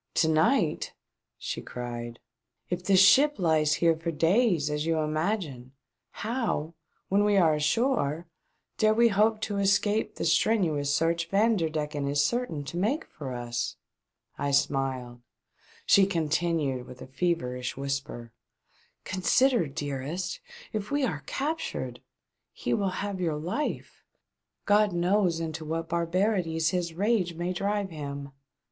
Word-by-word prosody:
"To 160 Hz, -, +3 dB
night 160 Hz, -, +1 dB, 0.2 s
!" -, -, -59 dB
she -, -, -4 dB
cried. 120 Hz, -1 st, -6 dB, 0.5 s
"If 180 Hz, 0 st, -2 dB
this 190 Hz, 0 st, +4 dB
ship 270 Hz, +11 st, +6 dB
lies 155 Hz, -4 st, +2 dB
here 165 Hz, -1 st, +3 dB
for 165 Hz, +1 st, -4 dB
days, 170 Hz, -, +2 dB
as 150 Hz, +1 st, -2 dB
you 165 Hz, -1 st, +1 dB
imagine, 155 Hz, -, -2 dB, 0.4 s
how, 215 Hz, -, -2 dB, 0.3 s
when 200 Hz, +2 st, +3 dB
we 205 Hz, -1 st, +3 dB
are 165 Hz, -4 st, +5 dB
ashore, 155 Hz, -, +1 dB, 0.5 s
dare 215 Hz, -1 st, +4 dB
we 235 Hz, +1 st, +5 dB
hope 215 Hz, +1 st, +2 dB
to 205 Hz, -2 st, -2 dB
escape 205 Hz, +2 st, +1 dB
the -, -, -3 dB
strenuous 160 Hz, -6 st, +2 dB
search 165 Hz, +3 st, +1 dB
Vanderdecken 160 Hz, -9 st, 0 dB
is 140 Hz, 0 st, +2 dB
certain 235 Hz, -, -2 dB
to 155 Hz, +5 st, -6 dB
make 235 Hz, -, 0 dB
for 140 Hz, -4 st, -8 dB
us 120 Hz, 0 st, -3 dB, 0.3 s
.'*" -, -, -46 dB
I 140 Hz, -, 0 dB
smiled; 135 Hz, -3 st, 0 dB, 0.6 s
she 195 Hz, -1 st, +6 dB
continued, 160 Hz, -6 st, -1 dB
with 125 Hz, 0 st, -10 dB
a -, -, -8 dB
feverish 130 Hz, -5 st, -2 dB
whisper: 135 Hz, -4 st, -4 dB, 0.4 s
" -, -, -37 dB
Consider, 230 Hz, -, +3 dB
dearest! 145 Hz, -, -4 dB, 0.3 s
If 210 Hz, -1 st, -3 dB
we 285 Hz, 0 st, 0 dB
are 160 Hz, -, -3 dB
captured 315 Hz, +4 st, -3 dB, 0.3 s
— -, -, -57 dB
he -, -, +1 dB
will 200 Hz, -3 st, +1 dB, 0.2 s
have 200 Hz, -2 st, -4 dB
your 160 Hz, -4 st, 0 dB
life 180 Hz, -, -4 dB, 0.3 s
' -, -, -59 dB, 0.3 s
God 205 Hz, -1 st, +3 dB
knows 175 Hz, 0 st, +2 dB
into 160 Hz, -1 st, -4 dB
what 165 Hz, +1 st, -3 dB
barbarities 170 Hz, -1 st, +1 dB
his 175 Hz, -3 st, -2 dB
rage 195 Hz, -3 st, +1 dB
may 175 Hz, +2 st, -2 dB
drive 200 Hz, +1 st, -1 dB
him 140 Hz, -2 st, -6 dB
!" -, -, -42 dB
165 Hz, 145 wpm, -28 LUFS, 150-200 Hz, 0.6 s, ship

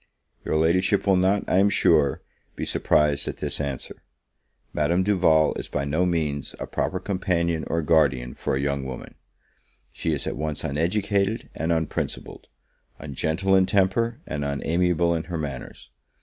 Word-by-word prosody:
Your -, -, -1 dB
Ladyship 90 Hz, +5 st, +2 dB
will 100 Hz, -1 st, +4 dB
not, 95 Hz, +2 st, +2 dB
I 95 Hz, -, +3 dB
am 100 Hz, +1 st, +4 dB
sure, 70 Hz, -7 st, +3 dB, 0.3 s
be -, -, -4 dB
surprised 75 Hz, -1 st, +2 dB
at -, -, -4 dB
this -, -, -3 dB
answer. 70 Hz, -2 st, -5 dB, 0.7 s
Madame 85 Hz, +5 st, +1 dB
Duval 90 Hz, -6 st, +3 dB
is -, -, -6 dB
by 70 Hz, -1 st, -2 dB
no 80 Hz, +6 st, +1 dB
means 75 Hz, -5 st, -2 dB
a -, -, -3 dB
proper -, -, -2 dB
companion 85 Hz, -4 st, -1 dB
or 85 Hz, -1 st, -1 dB
guardian 70 Hz, -6 st, +2 dB
for -, -, -2 dB
a -, -, -1 dB
young 70 Hz, -1 st, -1 dB
woman: 65 Hz, -2 st, -7 dB, 0.8 s
she 80 Hz, -, -2 dB
is 70 Hz, -3 st, -2 dB
at -, -, -3 dB
once 75 Hz, 0 st, -3 dB
uneducated 100 Hz, +7 st, 0 dB
and 80 Hz, +1 st, -2 dB
unprincipled; 80 Hz, -2 st, -3 dB, 0.5 s
ungentle 80 Hz, +6 st, 0 dB
in 95 Hz, -1 st, +4 dB
temper, 105 Hz, +4 st, +1 dB
and 75 Hz, -1 st, -4 dB
unamiable 85 Hz, +4 st, +1 dB
in 80 Hz, -1 st, -2 dB
her 85 Hz, 0 st, -4 dB
manners. 70 Hz, -5 st, -7 dB
80 Hz, 155 wpm, -24 LUFS, 70-95 Hz, 0.8 s, will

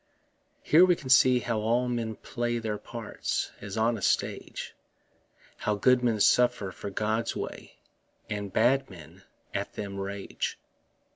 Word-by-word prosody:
Here 165 Hz, +4 st, +6 dB
we 180 Hz, -1 st, +5 dB
can 130 Hz, -, -9 dB
see 130 Hz, -1 st, +6 dB
how 115 Hz, -2 st, -1 dB
all 120 Hz, +3 st, +1 dB
men 115 Hz, -3 st, -2 dB
play 120 Hz, +1 st, -3 dB
Theirs 110 Hz, -2 st, -3 dB
parts, 115 Hz, -3 st, -3 dB
as 100 Hz, +1 st, -6 dB
on 115 Hz, 0 st, +2 dB
a -, -, -12 dB
stage -, -, -1 dB, 0.8 s
How 105 Hz, -, 0 dB
good 125 Hz, +4 st, +3 dB
men 115 Hz, -3 st, +2 dB
suffer 120 Hz, -2 st, +3 dB
for 100 Hz, -, -7 dB
God's 110 Hz, +3 st, -1 dB
way, -, -, -6 dB, 0.5 s
And 100 Hz, -1 st, -4 dB
bad 130 Hz, +6 st, +3 dB
men 85 Hz, -6 st, -13 dB, 0.3 s
at -, -, -3 dB
them 100 Hz, -1 st, -5 dB
rage. 100 Hz, 0 st, -4 dB
115 Hz, 145 wpm, -28 LUFS, 105-125 Hz, 0.8 s, Here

